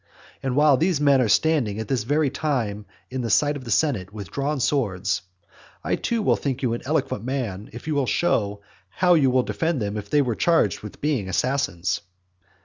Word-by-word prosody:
And 130 -2 -2
while 145 -2 +5
these 165 0 +1
men 140 -2 +4
are 120 - +2
standing 125 -4 +2
at 110 -1 -4
this 120 -4 -1
very 145 +1 +1
time 120 -9 -2 0.2
in 130 0 -3
the 115 - -3
sight 145 +7 +3
of 135 -3 -8
the - - -7
senate 105 - +1
with 100 -5 -8
drawn 140 +1 -1
swords, 100 -9 0 0.6
I - - 0
too 230 -2 -1
will - - +3
think 135 -2 -3
you 120 -3 +1
an 120 - -3
eloquent 140 -7 -1
man 115 -6 -3
if 120 - -10
you 155 - -1
will 140 -3 +1
show 105 -13 0 0.3
how 180 - +3
you 145 -6 +4
would 130 0 +2
defend 165 -3 -1
them 105 -1 -2
if 105 - -6
they 145 -1 +3
were 120 -3 -1
charged 165 - +2
with 105 - -10
being 135 -10 0
assassins. 95 -6 0
130 Hz, 205 wpm, -24 LUFS, 105-150 Hz, 0.6 s, while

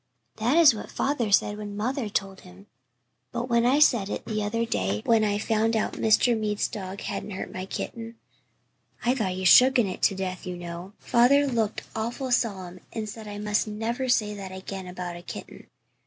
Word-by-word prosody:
"That 240 +8 +2
is 325 -6 +8
what 215 - -7
father 265 -6 -1
said 205 +1 +3
when 205 -1 -6
mother 235 +1 -2
told 195 -1 -3
him. 185 +2 -15 0.7
But 240 +1 -3
when 235 0 +3
l 270 +4 +4
said 235 -9 +4
it - - -4
the 215 -1 -2
other 230 +3 -1
day 100 - -1
when 225 -2 +4
I 205 -1 +1
found 225 +1 +1
out 220 - 0
Mr. 225 +2 +3
Mead's 210 -2 -1
dog 195 -1 -7
hadn't - - -4
hurt 190 -2 -6
my 185 +1 -5
kitten 230 +3 -6 0.9
I 245 - +4
thought 215 -8 -1
he 185 - -5
had 185 - +3
shooken 255 0 +7
it 185 - -6
to 195 - +3
death, 185 -1 -4
you 180 -1 -4
know 175 +2 -8
father 265 +4 +4
looked 230 -6 -1
awful 240 +4 -3
solemn 190 -7 -1
and 220 -2 -4
said 220 0 -8
I 205 0 -6
must 210 +1 0
never 230 +5 -3
say 215 -4 +2
that 195 -2 -7
again 190 0 -7
about 180 -1 -6
a - - -10
kitten. - - -9
210 Hz, 200 wpm, -26 LUFS, 190-235 Hz, 0.9 s, is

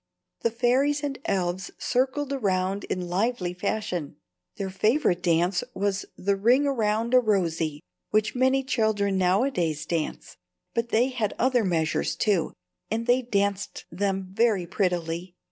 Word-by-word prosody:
The 230 - +1
fairies 260 +5 +2
and 280 -2 -3
elves 185 -1 -1
circled 265 +3 0
around 195 -5 0
in 180 -1 -3
lively 185 0 0
fashion. 180 -5 -3 0.4
Their 195 -1 -4
favorite 205 - +2
dance 175 +2 +2
was 195 0 -1
the 200 +1 +1
ring 240 +8 +3
round 230 -3 0
a 255 - +8
rosey 165 -9 0 0.3
which 215 0 +1
many 260 +1 +2
children 210 -6 +1
nowadays 180 - +1
dance. 165 -1 -3 0.4
But 230 0 -1
they 240 +4 +3
had 230 -6 -2
other 250 -1 +2
measures, 160 -4 0
too, 195 -7 +1 0.4
and 225 +1 -1
they 245 +1 +3
danced 200 -4 -1
them 190 +1 -1
very 210 -4 +2
prettily. 175 -1 -2
200 Hz, 135 wpm, -26 LUFS, 180-240 Hz, 0.4 s, a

